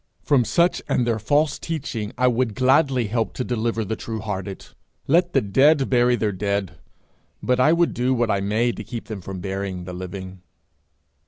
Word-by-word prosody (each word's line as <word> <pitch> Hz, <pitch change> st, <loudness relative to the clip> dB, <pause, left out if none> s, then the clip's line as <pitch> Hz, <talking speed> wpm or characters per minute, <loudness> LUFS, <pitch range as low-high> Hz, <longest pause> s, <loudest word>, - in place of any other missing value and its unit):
From 135 Hz, -5 st, +3 dB
such 170 Hz, -, +2 dB
and 120 Hz, -, +2 dB
their 115 Hz, -2 st, 0 dB
false 145 Hz, +7 st, +1 dB
teaching 130 Hz, -10 st, -4 dB
I 125 Hz, -, +2 dB
would 120 Hz, -3 st, +1 dB
gladly 130 Hz, -1 st, +3 dB
help 115 Hz, +2 st, -2 dB
to 125 Hz, -, -2 dB
deliver 115 Hz, -2 st, -1 dB
the 110 Hz, -, -2 dB
true 110 Hz, 0 st, -5 dB
hearted. 100 Hz, -3 st, -5 dB, 0.4 s
Let 175 Hz, +4 st, +2 dB
the 135 Hz, -, +4 dB
dead 135 Hz, +7 st, +3 dB
bury 120 Hz, -1 st, +4 dB
their 110 Hz, -3 st, 0 dB
dead, 100 Hz, -2 st, -2 dB, 0.6 s
but 125 Hz, 0 st, +1 dB
I 135 Hz, +5 st, +5 dB
would 170 Hz, 0 st, +2 dB
do 125 Hz, +2 st, 0 dB
what 120 Hz, -3 st, +1 dB
I 100 Hz, -, +1 dB
may 110 Hz, +5 st, +1 dB
to -, -, -7 dB
keep 120 Hz, -2 st, -7 dB
them 105 Hz, -4 st, -7 dB
from 95 Hz, 0 st, -7 dB
burying 95 Hz, -1 st, -4 dB
the 90 Hz, 0 st, -7 dB
living. 95 Hz, 0 st, -7 dB
115 Hz, 185 wpm, -23 LUFS, 100-130 Hz, 0.6 s, I